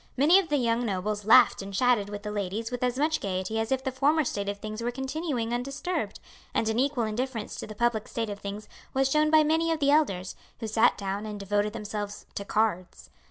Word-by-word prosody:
Many 315 +8 +6
of 365 -4 -3
the 295 - +2
young 235 -2 +1
nobles 205 0 -2
laughed 235 +1 +6
and 195 0 -7
chatted 240 -3 +2
with 205 0 -6
the 210 - -4
ladies 210 +3 -3
with 245 - -4
as 250 0 0
much 305 +2 +1
gaiety 190 +3 -2
as 225 +2 -2
if 265 0 +1
the 265 - -1
former 290 +5 +2
state 200 -6 -2
of 200 - -3
things 215 +2 -6
were 235 - -1
continuing 265 -2 -3
undisturbed; 275 +9 -3 0.4
and 220 - +1
an 220 +2 0
equal 270 -2 +1
indifference 225 +1 -3
to - - -6
the 215 - -8
public 235 -1 0
state 225 -2 -3
of 200 - -6
things 205 +1 -6 0.3
was 270 0 +2
shown 305 +1 +3
by 310 0 +6
many 325 +2 +2
of 325 - 0
the 280 -1 +3
elders, 195 -12 +1 0.2
who 230 - -4
sat 220 +2 +3
down 200 +2 -3
and 210 -1 -6
devoted 205 +1 0
themselves 210 -2 -5
to 200 - -4
cards. 185 - -1
225 Hz, 225 wpm, -27 LUFS, 205-270 Hz, 0.4 s, Many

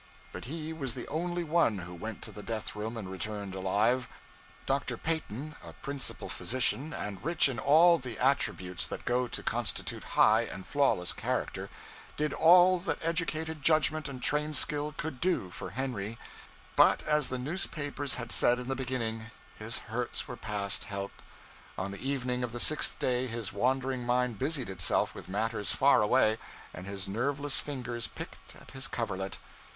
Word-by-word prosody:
But - - -7
he 160 +4 -4
was 135 -7 -3
the 125 - -6
only 175 +3 -1
one 160 -9 +2
who 90 -1 -7
went 110 +5 -6
to - - -5
the 105 - -9
death 110 -1 -4
room 110 +2 -4
and 105 -4 -5
returned 100 +1 -3
alive. 105 +7 +1 0.6
Dr. 135 -3 0
Peyton, 155 -2 -3
a - - -10
principal 140 -1 -3
physician, 130 +4 0
and 105 - -5
rich 165 +1 +4
in 130 -4 -3
all 165 +4 +6
the 125 -3 -6
attributes 95 -9 +1
that - - -6
go 125 +1 +1
to - - -2
constitute - - -1
high 110 +1 +6
and 95 -5 -6
flawless 135 -11 +2
character, - - -2 0.5
did 150 0 0
all 180 +2 +7
that 175 0 -2
educated 160 -1 -1
judgment 155 0 +3
and 130 -3 -7
trained 150 0 +2
skill 150 +2 +2
could 155 -5 -3
do 170 - +2
for - - -5
Henry; 115 -4 -3 0.6
but, - - +5
as 150 -2 +2
the 130 - -2
newspapers 145 -1 -2
had 120 -2 -4
said 120 - +5
in 125 +1 -6
the 135 - 0
beginning, 115 -4 -3 0.3
his 110 +2 -1
hurts 120 +3 -3
were 125 - -6
past 105 -4 -2
help. 100 -1 -4 0.7
On 95 +1 -3
the 100 - -8
evening 125 -2 -1
of 120 -2 -3
the 120 - -4
sixth 155 +5 +3
day 125 0 0
his 115 -3 -3
wandering 130 0 0
mind 125 -2 +1
busied 135 -2 0
itself 90 -3 +1
with - - -10
matters 105 +1 -1
far 135 -3 +5
away, 110 +1 +3 0.3
and 90 +2 -8
his 100 -1 -3
nerveless 140 +7 0
fingers 125 -5 -4
'picked - - -10
at - - -14
his 135 +2 -3
coverlet.' 95 -7 -3
125 Hz, 170 wpm, -30 LUFS, 110-145 Hz, 0.7 s, all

